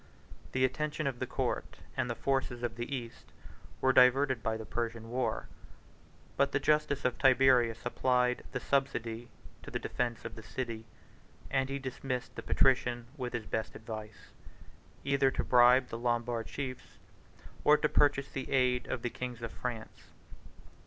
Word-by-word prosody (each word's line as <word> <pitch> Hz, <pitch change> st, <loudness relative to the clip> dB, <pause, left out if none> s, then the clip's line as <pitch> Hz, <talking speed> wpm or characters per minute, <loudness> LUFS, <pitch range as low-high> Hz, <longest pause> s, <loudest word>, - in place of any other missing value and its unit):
The 130 Hz, 0 st, +3 dB
attention 150 Hz, +3 st, -2 dB
of 130 Hz, -3 st, -2 dB
the -, -, -2 dB
court, -, -, -2 dB, 0.2 s
and 125 Hz, -, -1 dB
the 120 Hz, -, -1 dB
forces 130 Hz, -3 st, -1 dB
of 120 Hz, -2 st, -2 dB
the 120 Hz, +3 st, -5 dB
East, 120 Hz, -3 st, -8 dB, 0.5 s
were 130 Hz, 0 st, +4 dB
diverted 130 Hz, 0 st, +5 dB
by 110 Hz, 0 st, -1 dB
the 110 Hz, -, -7 dB
Persian 115 Hz, -1 st, -4 dB
war: 125 Hz, +1 st, -1 dB, 0.9 s
but 140 Hz, 0 st, +2 dB
the -, -, +3 dB
justice 150 Hz, -1 st, +1 dB
of 125 Hz, -2 st, 0 dB
Tiberius 125 Hz, -3 st, +4 dB
applied 125 Hz, 0 st, +1 dB
the -, -, -2 dB
subsidy 120 Hz, -4 st, -1 dB, 0.3 s
to -, -, -9 dB
the -, -, -2 dB
defence 120 Hz, -2 st, -3 dB
of 115 Hz, -, -5 dB
the 110 Hz, -, -9 dB
city; 115 Hz, -1 st, -5 dB, 0.7 s
and 135 Hz, 0 st, +1 dB
he 140 Hz, -, -2 dB
dismissed 130 Hz, -1 st, -4 dB
the -, -, -5 dB
patrician 120 Hz, -2 st, +2 dB
with 125 Hz, -4 st, -4 dB
his 120 Hz, -2 st, -3 dB
best 110 Hz, 0 st, -3 dB
advice, 110 Hz, -1 st, -8 dB, 0.7 s
either 140 Hz, -1 st, +3 dB
to -, -, -2 dB
bribe 125 Hz, +1 st, +6 dB
the 115 Hz, -, -5 dB
Lombard 120 Hz, -1 st, -1 dB
chiefs, 130 Hz, -3 st, -6 dB, 0.7 s
or 150 Hz, -, +7 dB
to 150 Hz, -, +2 dB
purchase 140 Hz, -2 st, +3 dB
the 135 Hz, -, -5 dB
aid 125 Hz, -2 st, +2 dB
of 130 Hz, -2 st, -3 dB
the 120 Hz, -, -1 dB
kings 125 Hz, -2 st, -6 dB
of 115 Hz, -, -4 dB
France. 115 Hz, -3 st, -6 dB
125 Hz, 160 wpm, -32 LUFS, 115-135 Hz, 0.9 s, or